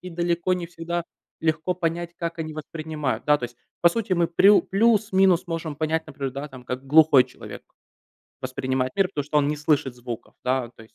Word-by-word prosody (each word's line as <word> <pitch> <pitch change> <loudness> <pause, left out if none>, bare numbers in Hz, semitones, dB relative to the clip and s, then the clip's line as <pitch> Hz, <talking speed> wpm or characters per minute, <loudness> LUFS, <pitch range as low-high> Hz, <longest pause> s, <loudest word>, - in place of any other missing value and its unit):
и 180 - -8
далеко 175 +1 0
не 180 -1 -4
всегда 170 0 -4 0.4
легко 160 +3 0
понять, 170 0 -3
как 170 0 -4
они 155 -1 -4
воспринимают, 155 -2 -4
да. 150 0 +5
То 125 - -4
есть, 120 0 -8 0.3
по 170 - +8
сути, 200 +1 -1
мы 170 -1 +2
прю 195 +5 +5
плюс-минус 195 -4 +3
можем 165 -3 -4
понять, 160 +2 -1
например, 140 -3 -5
да, 140 +3 -5
там, 130 -2 -12
как 130 +2 -5
глухой 150 -3 +6
человек - - -11 0.8
воспринимает 130 0 -2
мир, 195 -2 +3
потому 145 -7 -3
что 150 0 +1
он 145 0 +2
не 150 - -1
слышит 145 -4 +1
звуков, 120 -2 -8
да, 125 -2 0
то - - -13
есть 110 - -19
160 Hz, 195 wpm, -24 LUFS, 135-175 Hz, 0.8 s, по